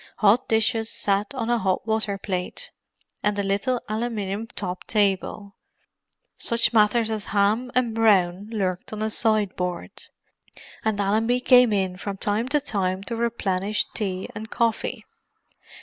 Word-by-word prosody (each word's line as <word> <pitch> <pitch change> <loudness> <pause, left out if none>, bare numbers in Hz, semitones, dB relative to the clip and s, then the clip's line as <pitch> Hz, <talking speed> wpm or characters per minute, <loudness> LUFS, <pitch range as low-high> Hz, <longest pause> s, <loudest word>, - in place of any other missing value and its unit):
Hot 215 +5 +4
dishes 225 0 +1
sat 205 -3 0
on 240 -2 -1
a 240 - +2
hot 190 0 0
water 220 -2 0
plate 185 -2 -4 0.5
and 210 0 +1
a 200 - 0
little 200 +6 0
aluminium 215 -1 -3
topped 185 -5 -5
table; 200 -1 0 0.8
such 235 0 +1
matters 220 +1 +3
as 215 -1 -3
ham 210 +5 +1
and 245 -3 +2
brawn 200 -4 +3
lurked 190 -5 -2
on 215 0 -4
a 220 - -1
sideboard; 185 - 0 0.9
and 220 -2 0
Allenby 220 +5 +2
came 250 -2 +6
in 190 -3 0
from 200 +1 -5
time 210 +5 -1
to 295 +3 +2
time 195 -8 -1
to 230 - -4
replenish 215 -3 0
tea 190 -3 -1
and 220 +1 -7
coffee. 230 0 -1
210 Hz, 140 wpm, -24 LUFS, 195-225 Hz, 0.9 s, came